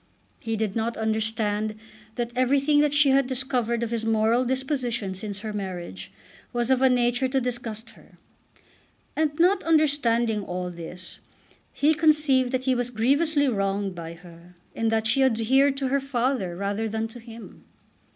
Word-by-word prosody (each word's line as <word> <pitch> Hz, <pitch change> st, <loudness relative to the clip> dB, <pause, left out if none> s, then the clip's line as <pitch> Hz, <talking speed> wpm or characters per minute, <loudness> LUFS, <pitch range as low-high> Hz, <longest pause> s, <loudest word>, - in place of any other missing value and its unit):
He 225 Hz, -1 st, -3 dB
did 210 Hz, -2 st, -2 dB
not 230 Hz, +1 st, -1 dB
understand 220 Hz, -1 st, -1 dB, 0.4 s
that 240 Hz, -1 st, -3 dB
everything 275 Hz, +3 st, +3 dB
that 295 Hz, -1 st, +2 dB
she 290 Hz, -1 st, +4 dB
had 270 Hz, -1 st, +3 dB
discovered 250 Hz, -3 st, -1 dB
of 235 Hz, -, -3 dB
his 230 Hz, -1 st, -2 dB
moral 225 Hz, +2 st, +2 dB
disposition 250 Hz, -6 st, -2 dB
since 200 Hz, +1 st, -6 dB
her 215 Hz, -1 st, -5 dB
marriage 175 Hz, -, -6 dB, 0.4 s
was 240 Hz, +1 st, 0 dB
of 260 Hz, -1 st, +3 dB
a 265 Hz, -, +5 dB
nature 245 Hz, +1 st, +2 dB
to 265 Hz, +1 st, 0 dB
disgust 240 Hz, -3 st, -4 dB
her. -, -, -20 dB, 1.0 s
And, 305 Hz, -1 st, 0 dB
not 365 Hz, +4 st, +4 dB
understanding 240 Hz, -9 st, +2 dB
all 180 Hz, -1 st, -4 dB
this, 175 Hz, +2 st, -9 dB, 0.5 s
he 300 Hz, +2 st, +2 dB
conceived 300 Hz, -5 st, +3 dB
that 255 Hz, -1 st, -1 dB
he 260 Hz, 0 st, +2 dB
was 245 Hz, -1 st, -1 dB
grievously 285 Hz, +6 st, +2 dB
wronged 195 Hz, -3 st, -1 dB
by 165 Hz, -1 st, -7 dB
her 175 Hz, 0 st, -16 dB, 0.2 s
in 225 Hz, -, -1 dB
that 225 Hz, 0 st, +1 dB
she 255 Hz, +5 st, +2 dB
adhered 265 Hz, +3 st, +3 dB
to 270 Hz, -1 st, -1 dB
her 280 Hz, +1 st, +2 dB
father 255 Hz, -8 st, -1 dB
rather 200 Hz, +4 st, -2 dB
than 220 Hz, +1 st, -2 dB
to 240 Hz, -, -11 dB
him. 230 Hz, -1 st, -12 dB
235 Hz, 160 wpm, -25 LUFS, 215-265 Hz, 1.0 s, a